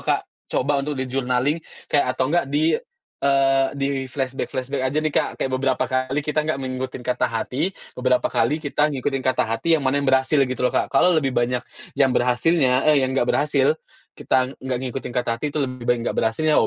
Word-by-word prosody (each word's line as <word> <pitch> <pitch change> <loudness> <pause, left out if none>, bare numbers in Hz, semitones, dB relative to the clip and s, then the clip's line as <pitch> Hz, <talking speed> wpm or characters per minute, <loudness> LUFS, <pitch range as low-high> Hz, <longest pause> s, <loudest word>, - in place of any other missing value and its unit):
Kak. - - +1 0.2
Coba 140 +2 +1
untuk 145 +1 -3
di-journaling 130 +3 0 0.2
kayak 130 -3 +1
atau - - +1
nggak 175 -5 +1
di, 155 +3 +2 0.5
eee, 135 -1 +3
di-flashback-flashback 135 -1 -2
aja 145 +4 -1
nih, 155 - 0
Kak. - - +1
Kayak 130 - -2
beberapa 135 -1 +1
kali 130 +2 -1
kita 150 0 -2
nggak 155 - +1
mengikutin 130 -1 -5
kata 125 - +1
hati, 135 - -2 0.2
beberapa 125 0 +1
kali 150 - +2
kita 150 -1 0
ngikutin 135 -1 -2
kata 130 - +2
hati 115 +9 +1
yang 145 - -4
mana 135 +2 +2
yang 140 - -1
berhasil 130 +2 +3
gitu 130 0 -2
loh, 125 - +2
Kak. - - +1
Kalau 175 +6 +4
lebih 135 -5 0
banyak 120 +1 +1 0.3
yang 135 - +3
berhasilnya 130 +2 +2
eh, 145 -3 +5
yang 130 - -2
nggak 125 -2 +1
berhasil, 150 - +2 0.4
kita 130 -1 +1
ng - - -8
nggak 130 -2 -1
ngikutin 130 -1 -5
kata 125 - -1
hati 135 - -3
itu 150 - -1
lebih 130 -3 -3
baik 120 0 +2
nggak - - -4
berhasilnya. 150 +8 +1
Oh - - +4
135 Hz, 200 wpm, -22 LUFS, 130-145 Hz, 0.5 s, eh